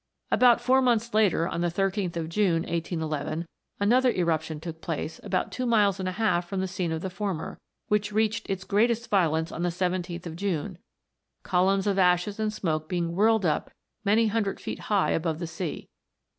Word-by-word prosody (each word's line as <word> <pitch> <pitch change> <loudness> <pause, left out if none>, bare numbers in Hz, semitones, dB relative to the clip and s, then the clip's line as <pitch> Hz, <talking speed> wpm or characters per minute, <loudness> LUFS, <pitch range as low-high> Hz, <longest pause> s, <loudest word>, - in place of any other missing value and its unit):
About 245 -2 +5
four 255 +2 +3
months 235 -3 +1
after, 205 -6 +3
on 170 - -3
the 175 - +2
13th 190 +1 -1
of 165 -1 -2
June, 170 -2 +1
1811, 160 -2 -3 0.3
another 250 +6 +4
eruption 160 -4 -1
took 160 0 -8
place 160 -1 -4
about 195 -3 -1
two 255 -1 -2
miles 205 -4 +3
and 185 -1 -1
a - - -4
half 180 -5 0
from 195 - -2
the 190 - -1
scene 180 -2 -2
of 160 0 -2
the 190 - -3
former, 190 -4 -4 0.3
which 210 -1 +1
reached 215 0 0
its 190 -1 -2
greatest 230 +4 +1
violence 160 -4 +2
on - - -5
the 175 - +1
17th 180 0 -2
of 165 -2 -6
June, 180 -1 -3 0.6
columns 190 +1 +2
of 200 -1 +1
ashes 180 +3 +2
and 215 -1 0
smoke 155 -7 -2
being 170 -2 -1
whirled 220 0 +3
up 155 -3 0 0.3
many 215 +2 +3
hundred 215 -2 -1
feet - - -5
high 205 -3 +2
above 160 -1 0
the 170 - -4
sea. 170 0 -5
185 Hz, 185 wpm, -27 LUFS, 170-210 Hz, 0.6 s, About